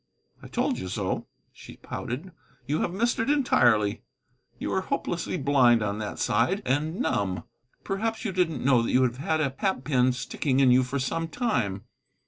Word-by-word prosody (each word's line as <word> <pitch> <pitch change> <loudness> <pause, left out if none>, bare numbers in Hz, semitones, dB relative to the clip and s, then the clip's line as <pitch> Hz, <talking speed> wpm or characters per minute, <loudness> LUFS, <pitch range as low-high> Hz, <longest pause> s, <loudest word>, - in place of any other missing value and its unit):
"I - - -10
told - - -1
you 95 - -5
so," 95 0 -3 0.3
she - - -13
pouted; 150 +11 -6 0.3
"you 150 +3 -1
have - - 0
missed 235 +6 0
it 225 - 0
entirely. 120 - +3 0.6
You - - -3
are - - +1
hopelessly - - -2
blind 130 -5 +4
on 100 0 -2
that 105 -1 -5
side, 170 - +1
and 155 - 0
numb. 95 - -1 0.4
Perhaps 220 +4 -2
you 215 - 0
didn't 175 -7 0
know 130 -3 +5
that 115 - -1
you 130 - +4
have 125 -1 0
had 155 +3 0
a 135 -3 0
hat 190 -9 0
pin 130 -3 +3
sticking 130 +2 -1
in 130 -2 +5
you 125 +1 +6
for 130 +2 -2
some 165 +5 -2
time." 120 - -1
135 Hz, 180 wpm, -26 LUFS, 120-180 Hz, 0.6 s, you